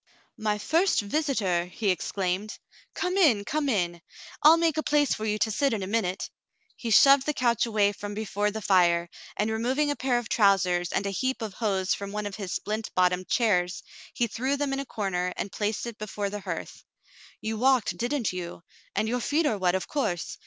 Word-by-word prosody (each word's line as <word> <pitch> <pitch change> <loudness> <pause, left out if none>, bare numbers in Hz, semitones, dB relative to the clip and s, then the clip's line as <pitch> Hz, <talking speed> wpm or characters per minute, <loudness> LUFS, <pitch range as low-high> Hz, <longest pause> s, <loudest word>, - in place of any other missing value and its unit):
*'My 215 -2 -1
first 330 - +2
visitor 205 - 0
!" - - -21
he 205 -4 +3
exclaimed. 185 +3 -2 0.4
"Come 365 +1 -1
in, 245 - +4
come 295 +2 -1
in. 175 -7 -1 0.4
I'll 315 +2 +8
make 330 -2 +1
a - - +2
place 295 -2 +2
for 215 - -4
you 210 -1 0
to 220 +1 0
sit 275 +4 +1
in 205 -3 -2
a - - -2
minute." 195 -2 -2 0.4
He 235 - -5
shoved 275 +5 +6
the 300 - 0
couch 240 -2 +1
away 210 -2 +2
from 205 0 -7
before 210 -1 -1
the 215 0 -6
fire, 175 -3 +3 0.3
and 215 +1 0
removing 260 +7 0
a - - -1
pair 255 -3 0
of 240 -2 -3
trousers 185 -4 +2
and 195 - -1
a 200 - -1
heap 260 +4 -2
of 215 -3 -5
hose 190 -3 0
from 200 0 -5
one 210 0 -3
of 205 0 -5
his 195 -4 -5
splint 215 +2 -3
bottomed 180 0 +2
chairs, 180 -6 +1 0.3
he 240 - +2
threw 260 +5 -1
them 280 -1 -1
in 270 - -1
a 275 - -5
corner 180 -5 -2
and 195 - -4
placed 210 +3 -2
it 235 -2 -7
before 205 -1 -4
the 210 - -4
hearth. - - -6 0.6
"You 220 0 -4
walked, 260 -2 +3
didn't 240 -3 -1
you? 175 -1 -6 0.3
And 215 - +1
your 245 +2 0
feet 310 +5 +1
are 215 -8 0
wet, 180 -1 +2
of 185 - -2
course. 210 - -2
215 Hz, 210 wpm, -27 LUFS, 195-260 Hz, 0.6 s, I'll